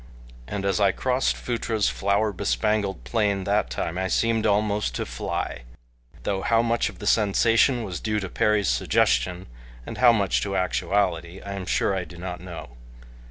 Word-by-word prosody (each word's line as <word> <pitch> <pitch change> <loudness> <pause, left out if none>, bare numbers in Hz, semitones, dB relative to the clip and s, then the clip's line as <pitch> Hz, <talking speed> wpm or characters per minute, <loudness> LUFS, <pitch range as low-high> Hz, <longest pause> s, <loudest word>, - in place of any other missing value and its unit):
And 100 -1 -4
as 100 +1 +1
I 100 -2 +4
crossed 130 +5 0
Phutra's 115 -3 -1
flower 100 +2 0
bespangled 100 - -1
plain 100 - 0
that 100 +3 +1
time 85 +3 -3
I 95 - 0
seemed 115 +2 +1
almost 105 - +1
to - - -2
fly, 60 - -4 0.6
though 95 -1 -1
how 115 +1 +2
much 115 0 +1
of - - -12
the 105 - -8
sensation 115 +4 +3
was 90 -5 -5
due 110 -1 -1
to 95 - -4
Perry's 105 0 +1
suggestion 60 +8 +1 0.4
and - - -7
how 125 -1 +7
much 100 -5 +1
to 100 -1 -2
actuality 90 -2 0
I 100 - -6
am 95 -2 -6
sure 100 - +1
I 95 -2 -2
do 85 +1 -13
not 90 0 -6
know. 85 -9 -9
100 Hz, 170 wpm, -25 LUFS, 90-110 Hz, 0.6 s, how